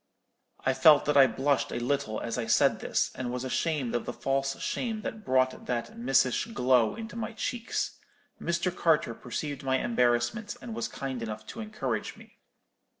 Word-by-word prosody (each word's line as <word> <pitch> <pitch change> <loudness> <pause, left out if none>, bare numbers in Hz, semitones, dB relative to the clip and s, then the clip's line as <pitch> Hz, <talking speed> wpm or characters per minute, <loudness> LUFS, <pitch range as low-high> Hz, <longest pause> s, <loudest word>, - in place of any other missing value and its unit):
"I 130 - +3
felt 155 +2 +6
that 150 - +1
I 135 -1 +8
blushed 135 +4 0
a - - -4
little 120 -3 -1
as 115 -1 -3
I 115 - -2
said - - +4
this, - - 0
and 125 -2 -4
was 125 0 -3
ashamed 135 -1 -1
of 120 - -1
the 120 - -3
false 135 +1 -1
shame 225 -4 -2
that 215 -1 -5
brought 130 -4 +1
that 120 -1 -2
missish 125 - +2
glow 125 - +3
into 225 0 -7
my 225 0 -4
cheeks. 235 +1 -3 0.4
Mr. 170 +1 -1
Carter 155 -8 +2
perceived 140 +4 -5
my 130 0 +2
embarrassment, 120 - +1
and 235 - -7
was 225 0 -2
kind 130 -3 -5
enough 110 -1 -5
to 225 - -7
encourage 135 - -3
me. - - -17
135 Hz, 175 wpm, -29 LUFS, 120-170 Hz, 0.4 s, I